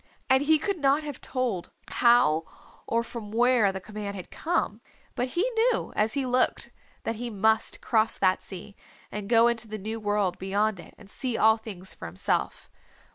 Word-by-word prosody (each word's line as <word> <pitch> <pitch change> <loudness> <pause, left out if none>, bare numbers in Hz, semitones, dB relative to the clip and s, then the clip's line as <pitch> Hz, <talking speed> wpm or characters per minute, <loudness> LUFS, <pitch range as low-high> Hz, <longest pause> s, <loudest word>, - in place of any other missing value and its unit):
And 265 0 +5
he 310 +2 +4
could 390 +4 -2
not 285 +2 +3
have 290 -3 -7
told 245 -9 -2 0.2
how 200 -10 +4 0.4
or 230 0 +1
from 230 -3 -7
where 235 -2 +4
the 190 - -5
command 205 +1 -6
had 185 - -9
come, 270 - -1 0.3
but 250 - -1
he 355 - +4
knew 470 +1 +1
as 215 +1 +1
he 275 -2 0
looked 250 0 0 0.3
that 225 - -2
he 240 +1 -4
must 220 +1 +1
cross 220 -1 +1
that 185 -1 +2
sea 200 +2 -10 0.4
and 210 -1 -5
go 230 0 +6
into 235 -1 0
the 215 0 -5
new 220 +3 -5
world 205 -3 0
beyond 200 +1 0
it - - -13
and 210 - -15
see 245 +3 -3
all 220 +1 +5
things 195 -4 -9
for - - -8
himself. 90 +3 -2
220 Hz, 185 wpm, -27 LUFS, 200-250 Hz, 0.4 s, go